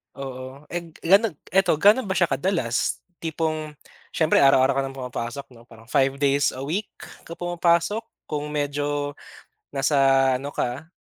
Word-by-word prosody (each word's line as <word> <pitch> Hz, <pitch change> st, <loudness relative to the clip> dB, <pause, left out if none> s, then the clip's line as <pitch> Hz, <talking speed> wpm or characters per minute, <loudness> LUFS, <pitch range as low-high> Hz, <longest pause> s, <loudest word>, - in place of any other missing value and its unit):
Oo, 130 Hz, +1 st, -8 dB
and 170 Hz, -2 st, -5 dB
ganog 195 Hz, +1 st, +4 dB, 0.2 s
eto 185 Hz, -3 st, +3 dB
ga'no 205 Hz, -, +5 dB
ba 190 Hz, -, -1 dB
siya 175 Hz, -5 st, +2 dB
kadalas? 135 Hz, -6 st, 0 dB, 0.2 s
Tipong 155 Hz, -2 st, -3 dB, 0.4 s
siyempre 160 Hz, -1 st, +3 dB
araw-araw 135 Hz, 0 st, +5 dB
ka -, -, 0 dB
ng 135 Hz, -, -9 dB
pumapasok 125 Hz, 0 st, -5 dB
'no 120 Hz, 0 st, -17 dB
parang 115 Hz, 0 st, -15 dB
5 135 Hz, 0 st, +3 dB
days 140 Hz, -1 st, +2 dB
a 130 Hz, -, -6 dB
week 180 Hz, +9 st, -2 dB, 0.4 s
ka 170 Hz, -, -7 dB
pumapasok, 175 Hz, +4 st, +1 dB, 0.2 s
kung 150 Hz, -1 st, -4 dB
medyo 145 Hz, 0 st, -2 dB, 0.6 s
nasa 140 Hz, +2 st, 0 dB, 0.4 s
ano 140 Hz, +3 st, -4 dB
ka 140 Hz, +6 st, -4 dB
145 Hz, 145 wpm, -24 LUFS, 135-170 Hz, 0.6 s, ga'no